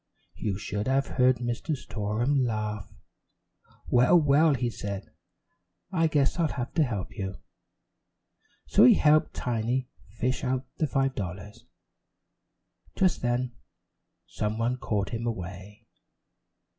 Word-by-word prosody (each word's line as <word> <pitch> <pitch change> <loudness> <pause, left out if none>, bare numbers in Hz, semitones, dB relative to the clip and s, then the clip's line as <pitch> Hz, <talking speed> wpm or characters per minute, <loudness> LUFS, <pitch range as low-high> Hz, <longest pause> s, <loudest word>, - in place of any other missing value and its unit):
You 100 -3 -3
should 105 +1 -3
have 135 +1 +2
heard 130 0 +3
Mr. 120 +5 -2
Storem 120 +6 -1
laugh. 105 -4 -3 1.0
"Well, 125 +8 +5
well," 150 0 +4
he 120 -1 -1
said, 100 -2 -6 0.8
"I 165 -3 +2
guess 150 +1 +1
I'll 165 - +3
have 125 -2 -4
to 165 - +3
help 110 -9 -4
you." 95 -3 -4 1.3
So 65 - +4
he 125 - +8
helped 155 0 +3
Tiny 125 +2 -1 0.2
"fish" 120 +8 -2
out 130 0 -1
the 155 - +1
five 135 -1 +1
dollars. 100 0 -7 1.3
Just 185 -3 +2
then 120 +1 0 0.7
some 105 +1 -3
one 120 +2 0
called 105 -5 -1
him 115 +1 -3
away. 100 +1 -6
120 Hz, 120 wpm, -27 LUFS, 105-135 Hz, 1.3 s, he